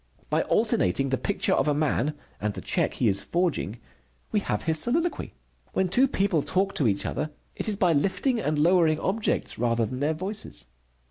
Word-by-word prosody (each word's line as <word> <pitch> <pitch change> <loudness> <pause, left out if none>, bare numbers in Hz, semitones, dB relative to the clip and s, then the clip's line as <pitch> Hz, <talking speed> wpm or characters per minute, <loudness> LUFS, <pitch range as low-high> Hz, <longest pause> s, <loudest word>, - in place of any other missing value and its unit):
By - - +3
alternating 135 +10 +1
the 130 - +1
picture 195 -1 +1
of - - +2
a 145 - +2
man 150 -1 0 0.2
and 105 0 -2
the - - -6
check - - -1
he 120 - +1
is 100 -1 +1
forging, 170 - -1 0.5
we 210 - +2
have 110 - -2
his 160 -1 +2
soliloquy. 330 - 0 0.4
When 190 -1 +1
two 255 +9 +4
people 195 - +1
talk 195 +6 0
to 135 - +2
each 100 -2 0
other, 155 - -2 0.3
it - - -3
is 210 - +1
by 180 -4 +3
lifting 195 - +1
and 150 -7 -1
lowering 165 0 +4
objects 205 - -1
rather 115 -1 +1
than 125 +4 -5
their 150 +3 0
voices. 200 +6 -5
160 Hz, 190 wpm, -26 LUFS, 130-195 Hz, 0.5 s, two